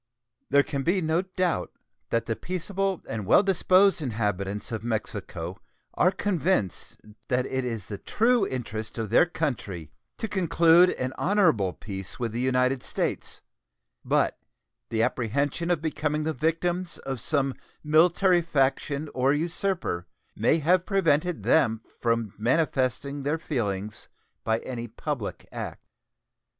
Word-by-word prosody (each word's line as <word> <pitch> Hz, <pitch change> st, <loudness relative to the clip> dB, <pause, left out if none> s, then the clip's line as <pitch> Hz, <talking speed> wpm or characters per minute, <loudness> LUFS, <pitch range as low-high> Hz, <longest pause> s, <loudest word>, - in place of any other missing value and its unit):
There 140 Hz, 0 st, +5 dB
can 140 Hz, -1 st, -3 dB
be 175 Hz, +7 st, +2 dB
no 160 Hz, 0 st, +1 dB
doubt 185 Hz, -, -1 dB, 0.4 s
that 115 Hz, 0 st, 0 dB
the 115 Hz, -, -1 dB
peaceable 190 Hz, -, -2 dB
and 110 Hz, -1 st, -3 dB
well 95 Hz, -, +5 dB
disposed 190 Hz, 0 st, +4 dB
inhabitants 105 Hz, -4 st, -2 dB
of 110 Hz, -1 st, -3 dB
Mexico 100 Hz, -6 st, -4 dB, 0.3 s
are 180 Hz, -, +4 dB
convinced 185 Hz, -, -1 dB, 0.3 s
that 125 Hz, 0 st, +1 dB
it 130 Hz, -1 st, -2 dB
is 115 Hz, -5 st, -4 dB
the 100 Hz, -2 st, -6 dB
true 230 Hz, -2 st, +2 dB
interest 110 Hz, -4 st, -5 dB
of 110 Hz, -2 st, -3 dB
their 160 Hz, -, +6 dB
country 125 Hz, -, -3 dB, 0.3 s
to 225 Hz, -, -3 dB
conclude 175 Hz, -2 st, +5 dB
an 130 Hz, -4 st, -3 dB
honorable 165 Hz, -, +3 dB
peace 95 Hz, -3 st, -7 dB
with 120 Hz, -2 st, -1 dB
the 115 Hz, -, -3 dB
United 125 Hz, 0 st, +2 dB
States, -, -, -3 dB, 0.6 s
but -, -, +1 dB, 0.5 s
the 115 Hz, 0 st, +1 dB
apprehension 140 Hz, +9 st, 0 dB
of 170 Hz, -3 st, +1 dB
becoming 150 Hz, -1 st, -1 dB
the 160 Hz, +1 st, -1 dB
victims 170 Hz, +4 st, -1 dB
of 135 Hz, -2 st, -5 dB
some 140 Hz, -3 st, +1 dB, 0.3 s
military 175 Hz, +4 st, +4 dB
faction 140 Hz, -1 st, 0 dB
or 130 Hz, +2 st, +3 dB
usurper 170 Hz, -, -1 dB, 0.3 s
may -, -, +3 dB
have 170 Hz, +3 st, +3 dB
prevented 175 Hz, -3 st, +1 dB
them 115 Hz, -8 st, +3 dB, 0.2 s
from 115 Hz, -3 st, 0 dB
manifesting 135 Hz, +2 st, 0 dB
their 145 Hz, +4 st, 0 dB
feelings 105 Hz, -, -3 dB, 0.4 s
by 110 Hz, 0 st, +1 dB
any 120 Hz, -2 st, -5 dB
public 120 Hz, -1 st, -5 dB
act. -, -, -6 dB
140 Hz, 135 wpm, -27 LUFS, 115-170 Hz, 0.6 s, their